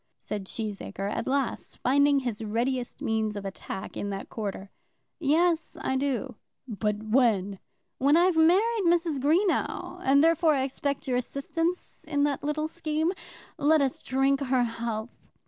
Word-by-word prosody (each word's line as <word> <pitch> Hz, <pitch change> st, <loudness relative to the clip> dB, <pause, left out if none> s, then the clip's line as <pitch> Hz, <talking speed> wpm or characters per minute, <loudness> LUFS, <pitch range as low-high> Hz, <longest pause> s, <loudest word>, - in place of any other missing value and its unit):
said 205 Hz, -2 st, -5 dB
Cheesacre, 205 Hz, -2 st, -4 dB
at -, -, -3 dB
last, 275 Hz, -1 st, -2 dB
finding 280 Hz, +2 st, +3 dB
his 230 Hz, -4 st, -3 dB
readiest 240 Hz, +3 st, -2 dB
means 220 Hz, -1 st, 0 dB
of 200 Hz, -1 st, -5 dB
attack 190 Hz, 0 st, -6 dB
in 205 Hz, -, -3 dB
that 195 Hz, -1 st, -5 dB
quarter. 200 Hz, -2 st, -5 dB, 0.5 s
"Yes, 330 Hz, +2 st, +1 dB
I 265 Hz, -, -1 dB
do." 265 Hz, -3 st, -2 dB, 0.3 s
"But 210 Hz, -2 st, -2 dB
when?" 215 Hz, -5 st, +2 dB, 0.4 s
"When 285 Hz, +4 st, +4 dB
I've 355 Hz, 0 st, +4 dB
married 385 Hz, +7 st, +4 dB
Mrs. 335 Hz, -4 st, +2 dB
Greenow, 355 Hz, +3 st, 0 dB
and, 280 Hz, +2 st, +5 dB
therefore, 330 Hz, -1 st, +4 dB
I 265 Hz, -, +1 dB
expect 275 Hz, +1 st, -3 dB
your 250 Hz, -1 st, +1 dB
assistance 330 Hz, +7 st, -3 dB
in 285 Hz, -2 st, +1 dB
that 290 Hz, -2 st, 0 dB
little 305 Hz, +1 st, -1 dB
scheme. 315 Hz, 0 st, -1 dB, 0.5 s
Let 310 Hz, +2 st, +4 dB
us 275 Hz, -2 st, 0 dB
drink 270 Hz, +1 st, +1 dB
her 260 Hz, -3 st, +1 dB
health. 230 Hz, -1 st, -3 dB
270 Hz, 145 wpm, -27 LUFS, 225-315 Hz, 0.5 s, and